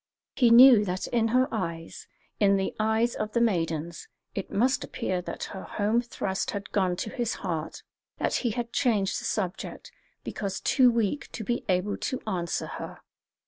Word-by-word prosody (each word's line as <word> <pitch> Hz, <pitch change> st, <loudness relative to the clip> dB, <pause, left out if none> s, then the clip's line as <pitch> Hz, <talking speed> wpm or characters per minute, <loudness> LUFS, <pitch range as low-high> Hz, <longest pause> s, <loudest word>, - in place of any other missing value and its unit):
He 245 Hz, -3 st, +4 dB
knew 240 Hz, -2 st, +9 dB
that 185 Hz, 0 st, -2 dB
in 230 Hz, -2 st, +1 dB
her 255 Hz, +3 st, +3 dB
eyes, 165 Hz, -6 st, -5 dB, 0.3 s
in 200 Hz, -1 st, +4 dB
the 190 Hz, -, -2 dB
eyes 220 Hz, +2 st, +2 dB
of 215 Hz, 0 st, -4 dB
the 235 Hz, -, +2 dB
maidens, 170 Hz, -6 st, -1 dB, 0.3 s
it 195 Hz, -, -4 dB
must 250 Hz, +5 st, +1 dB
appear 185 Hz, -1 st, -3 dB
that -, -, -6 dB
her 190 Hz, -, -6 dB
home 215 Hz, +3 st, 0 dB
thrust 195 Hz, -5 st, -3 dB
had 200 Hz, -4 st, -5 dB
gone 185 Hz, -3 st, +1 dB
to 215 Hz, -, -4 dB
his 240 Hz, -3 st, -2 dB
heart, 165 Hz, -4 st, -4 dB, 0.3 s
that -, -, -1 dB
he 240 Hz, -, 0 dB
had 235 Hz, +2 st, -4 dB
changed 205 Hz, -6 st, +1 dB
the -, -, -7 dB
subject 185 Hz, -4 st, -4 dB, 0.3 s
because 195 Hz, -1 st, -4 dB
too 255 Hz, -3 st, +4 dB
weak 235 Hz, +3 st, -1 dB
to 225 Hz, -, -5 dB
be 240 Hz, +3 st, -2 dB
able 185 Hz, +2 st, +1 dB
to 260 Hz, -, -3 dB
answer 175 Hz, -5 st, -2 dB
her. -, -, -8 dB
210 Hz, 175 wpm, -27 LUFS, 185-235 Hz, 0.3 s, knew